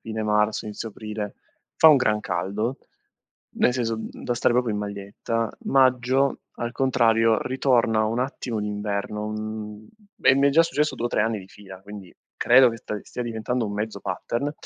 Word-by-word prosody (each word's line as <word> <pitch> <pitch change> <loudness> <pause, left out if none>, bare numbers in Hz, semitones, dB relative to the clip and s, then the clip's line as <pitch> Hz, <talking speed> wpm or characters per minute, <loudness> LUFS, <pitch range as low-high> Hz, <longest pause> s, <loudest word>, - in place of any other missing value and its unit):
fine 110 -1 -4
marzo, 105 +1 +1
inizio 105 +2 -6
aprile, 105 -1 -6 0.4
fa 160 - +8
un 150 - +7
gran 105 -4 +2
caldo. 105 +6 -2 0.7
Nel 125 - +2
senso, 115 -3 -1
mhmm, 110 - -6 0.2
da 120 - 0
stare 120 - +2
proprio 125 -3 +1
in 105 - -2
maglietta. 105 +2 -3
Maggio, 130 0 +2 0.2
al 120 0 -3
contrario, 115 -4 +3
ritorna 120 -4 +2
un 115 +3 -1
attimo 125 -3 -3
l'inverno, 105 0 -3
mhmm, 110 0 -6 0.4
e 130 - +6
mi 140 +1 +4
è - - +2
già 165 +4 +6
successo 150 -2 0
2 120 - -1
o - - -2
3 - - +1
anni 110 -1 -1
di 95 - -11
fila, 95 -2 -13
quindi 100 -3 -10 0.2
credo 125 +1 +6
che 115 - -5
st 105 -1 -5
stia 125 - -6
diventando 120 +1 -2
un 100 - -5
mezzo 105 0 -4
pattern 120 +9 -3
110 Hz, 180 wpm, -24 LUFS, 105-125 Hz, 0.7 s, fa